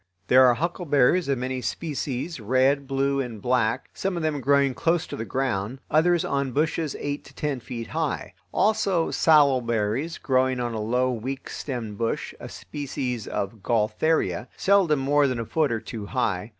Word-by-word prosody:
There 130 +1 +7
are 120 - +4
huckleberries 170 -1 +2
of 135 - +2
many 130 +1 -3
species, 150 +1 -3
red, 130 +5 +2
blue, 140 +1 0
and 120 -5 -4
black, 120 +2 0
some 190 -2 -2
of 170 - -3
them 150 -3 -1
growing 140 0 +3
close 165 +5 +1
to - - -7
the 115 - -4
ground, 125 -2 -2
others 170 +2 +3
on 140 -2 -1
bushes 155 +1 0
eight 145 0 -3
to - - -15
ten 145 -3 -2
feet 115 0 -7
high; - - -2 0.2
also 195 -5 +2
salal 145 -5 +5
berries, 115 +7 -1
growing 130 -1 +1
on 120 -1 -2
a 110 - -3
low, 125 +4 +1
weak 130 +3 -5
stemmed 115 -7 -5
bush, 115 -1 -2
a - - -8
species 130 -5 -5
of 100 +2 -4
gaultheria, 115 +9 +1
seldom 190 -6 +3
more 140 +2 +3
than 125 -3 -2
a 115 - -3
foot 155 +3 +1
or 115 - 0
two 110 -2 -7
high. 105 -5 -1
130 Hz, 175 wpm, -25 LUFS, 120-150 Hz, 0.2 s, There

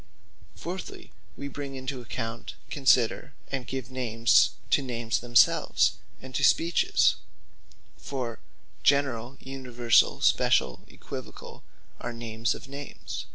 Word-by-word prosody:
Fourthly, 180 +2 -7 0.3
we 140 - -5
bring 140 0 -6
into 130 0 -5
account, 115 +1 -5 0.2
consider, 135 0 +2 0.2
and 135 -3 -3
give 130 -1 -5
names, 120 -3 +3 0.2
to - - +4
Names 120 -3 -2
themselves, 120 -1 +4 0.3
and 130 0 -11
to 140 - -1
Speeches: 170 +5 +3 0.8
For, 125 -4 -5 0.4
Generall, 135 -1 +1
Universall, 125 -3 +2
Speciall, 60 - +3
Oequivocall, - - -9 0.4
are 120 - -5
names 115 0 -2
of - - -10
Names. 140 +1 -7
130 Hz, 110 wpm, -27 LUFS, 115-135 Hz, 0.8 s, to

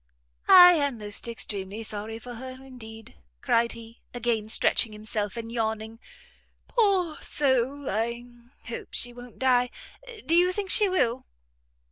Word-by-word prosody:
"I 360 -1 +10
am 285 -7 0
most 205 +1 -2
extremely 205 -1 -5
sorry 215 +1 -5
for 245 +2 -9
her 255 +2 -8
indeed," 230 - -12 0.2
cried 235 0 +1
he, 230 0 -13
again 230 -3 -1
stretching 220 0 +3
himself 210 0 -3
and 230 0 -6
yawning; 220 -1 -3 0.7
"poor 385 -8 +1
soul! 270 0 0
I 235 +3 -2 0.4
hope 230 - -7
she 245 0 +2
won't 245 0 -13
die. 250 -1 +2 0.6
Do 330 - +2
you 355 +1 +4
think 395 -1 -3
she 415 -3 +4
will!" 255 -9 0
235 Hz, 135 wpm, -26 LUFS, 220-265 Hz, 0.7 s, I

